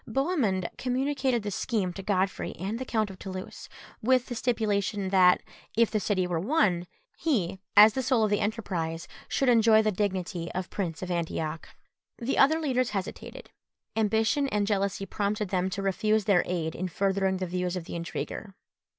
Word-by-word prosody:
Bohemund 230 - 0
communicated 260 -2 0
the 205 - -3
scheme 195 -3 -1
to 195 - -7
Godfrey 190 -1 -1
and 200 +6 -4
the 260 - -4
Count 220 -5 0
of 185 - -12
Toulouse, 185 -1 -7 0.3
with 255 +2 +3
the - - -5
stipulation 210 -4 0
that, 185 -2 +5 0.3
if 230 -1 +4
the 215 - +1
city 195 -3 0
were 175 -2 -1
won, 185 - +1 0.3
he, 195 - 0 0.2
as 210 +1 +9
the 265 - -1
soul 250 -3 +2
of 210 - +1
the 205 - +2
enterprise, 180 -7 -2 0.2
should 270 - 0
enjoy 225 -2 +5
the 215 - +2
dignity 185 -3 -2
of 185 0 -4
Prince 175 -4 -3
of 185 - -4
Antioch. 160 -2 -3 0.5
The 245 +3 -1
other 310 +4 +5
leaders 255 -5 +1
hesitated: 195 -3 -6 0.4
ambition 220 +6 +2
and 210 -5 0
jealousy 200 -1 -1
prompted 205 +1 -2
them 185 0 0
to 195 +1 -4
refuse 215 +2 +1
their 195 -4 +4
aid 165 -3 -2
in 185 - -3
furthering 190 +1 0
the 185 - -2
views 180 0 -2
of 180 - -4
the - - -8
intriguer. 180 +4 -5
200 Hz, 175 wpm, -28 LUFS, 185-225 Hz, 0.5 s, as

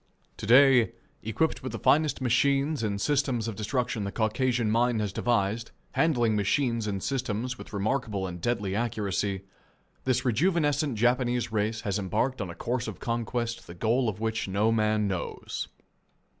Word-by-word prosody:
To - - -6
day, 125 -1 +6 0.3
equipped 110 +9 -1
with 130 - -5
the - - -3
finest 145 +2 +2
machines 140 +4 +2
and 100 -3 -1
systems 130 -3 +1
of 115 - -4
destruction 110 +1 -1
the 100 - -3
Caucasian 115 +1 +1
mind 120 0 +2
has 105 -2 -2
devised, 115 0 0 0.2
handling 120 -9 +2
machines 115 +2 +1
and 100 -2 -3
systems 125 -2 -2
with - - -10
remarkable 105 -1 -1
and 90 -2 -6
deadly 100 -4 -1
accuracy, 100 -3 -1 0.6
this 130 -1 +1
rejuvenescent 145 - +1
Japanese 120 +1 +1
race 110 +1 -1
has 100 0 -1
embarked 110 +6 -1
on 95 - -3
a 85 - -7
course 125 +1 -2
of - - -6
conquest 115 0 -2
the 85 - -9
goal 115 +5 +1
of 105 - -5
which 110 -1 -1
no 100 +4 +2
man 110 -1 +2
knows. 95 -3 -4
115 Hz, 155 wpm, -28 LUFS, 105-130 Hz, 0.6 s, day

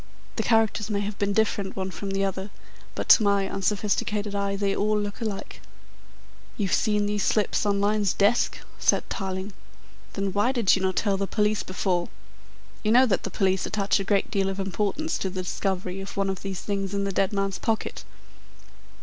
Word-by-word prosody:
The - - 0
characters 220 -2 +2
may 205 -1 0
have 205 0 -4
been 200 0 +1
different 200 -2 0
one 190 0 -3
from 200 +1 -5
the 195 0 0
other, 190 +1 -3 0.5
but - - -3
to - - +9
my 200 -2 +2
unsophisticated 205 +1 -1
eye 200 0 -1
they 195 0 0
all 210 +1 +1
look 205 +3 -4
alike." 215 -3 -5 1.0
"You've 200 -4 0
seen 210 -2 +2
these 205 0 -1
slips 210 0 +1
on 200 -1 +2
Lyne's 205 -1 +2
desk?" 205 +7 +2 0.2
said - - +2
Tarling. 190 +1 -3 0.6
"Then 195 -1 -2
why 205 +6 +2
did 235 -7 +4
you 190 - -2
not 190 -1 0
tell 200 -3 +1
the 195 0 -1
police 210 0 +1
before? 180 -2 -1 0.7
You 215 - +1
know 250 +3 +7
that 200 -7 +1
the - - -4
police 190 -1 +1
attach 200 -1 +1
a - - -1
great 200 0 +1
deal 195 -1 +1
of 195 0 -4
importance 205 - -1
to 190 - -1
the 185 0 -4
discovery 185 0 -2
of 195 +1 -8
one 195 -1 +1
of 190 - -6
these 195 -2 -4
things 200 -1 -2
in 200 - 0
the 200 - -1
dead 190 +1 +1
man's 195 -2 -1
pocket?" 225 -1 -2
200 Hz, 190 wpm, -26 LUFS, 195-210 Hz, 1.0 s, to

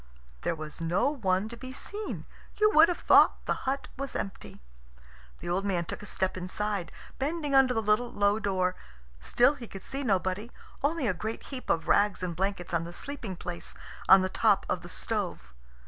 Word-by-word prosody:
There - - 0
was 155 0 -8
no 175 - +2
one 195 -7 0
to 235 - -7
be 255 +2 -8
seen. 410 +10 -5 0.3
You 425 0 +4
would 320 +2 +8
have 355 - -1
thought - - +5
the - - +1 0.2
hut 275 +1 -2
was 275 0 -5
empty. 195 - -5 0.8
The - - -9
old 185 +3 0
man 180 -4 0
took - - -6
a 205 - -9
step 190 0 -1
inside, 185 +1 -3 0.3
bending 295 +1 -1
under 265 -2 +5
the 225 - 0
little 215 +3 +2
low 205 -1 +2
door. 185 -3 0 0.4
Still 240 - +4
he 250 -5 -9
could 195 - -9
see 275 - -4
nobody, 200 -1 0 0.3
only 295 0 +1
a 205 - +2
great 220 +6 -5
heap 255 -2 -6
of 165 - +1
rags 205 -2 +3
and 175 -2 -2
blankets 190 -1 -2
on 165 -1 +1
the 170 +1 -7
sleeping 240 -5 -5
place 175 0 -7 0.3
on 190 0 +9
the 185 - +1
top 205 +1 +2
of - - -1
the - - -10
stove. - - -4
205 Hz, 195 wpm, -29 LUFS, 185-260 Hz, 0.8 s, on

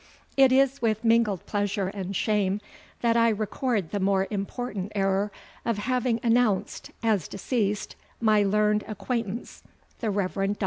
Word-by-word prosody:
It 270 -1 +6
is 270 +1 +3
with 220 -1 0
mingled 225 -5 +3
pleasure 205 -2 -1
and 195 -1 -5
shame 205 -1 +1 0.4
that 235 -1 +3
I 230 0 +5
record 215 - -1
the 205 - -1
more 195 0 +2
important 205 0 -4
error, 195 +1 +1 0.3
of 230 -2 0
having 245 +1 0
announced 230 -4 +1
as 215 -7 +1
deceased 210 0 -2 0.2
my 215 -2 +4
learned 210 +1 +2
acquaintance, 220 +1 -4 0.4
the 225 - -1
Rev. 195 -2 -1
Dr. 195 +1 0
210 Hz, 140 wpm, -26 LUFS, 195-230 Hz, 0.4 s, It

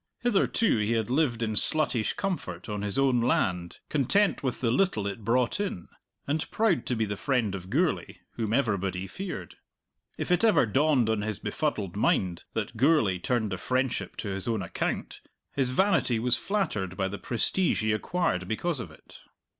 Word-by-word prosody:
Hitherto 225 - +2
he 105 +2 +1
had 115 0 -1
lived 130 -5 +1
in 110 -1 -1
sluttish 125 -2 +2
comfort 95 - -3
on 105 -1 -3
his 105 +2 -2
own 130 -3 +3
land, 90 -7 0
content 175 +9 +2
with 130 -3 -2
the 115 -3 +1
little 125 - +1
it 100 +2 -4
brought 120 - +1
in, 195 - -3 0.4
and 150 +3 -1
proud 215 -6 +1
to 125 - 0
be 110 -1 0
the 105 0 -3
friend 120 -3 0
of 95 -1 -6
Gourlay, 160 - 0
whom 110 -3 -3
everybody 100 -7 0
feared. 185 - -6 0.6
If - - -3
it 180 - +3
ever 220 - +5
dawned 135 +1 +2
on 110 -2 +1
his 105 -1 -2
befuddled 105 - -2
mind 90 -4 +1
that - - -3
Gourlay 120 - +3
turned 110 +1 0
the 95 - -3
friendship 130 +1 -1
to 105 - -4
his 95 +1 -4
own 110 -4 0
account, 85 - -3 0.3
his 135 -3 0
vanity 130 - +2
was 120 +2 +3
flattered 110 - -2
by 95 -1 0
the 100 +1 -6
prestige 150 - +1
he 110 - +2
acquired 105 - -1
because 145 - -1
of 110 -8 -6
it. 80 - -16
115 Hz, 180 wpm, -28 LUFS, 100-150 Hz, 0.6 s, ever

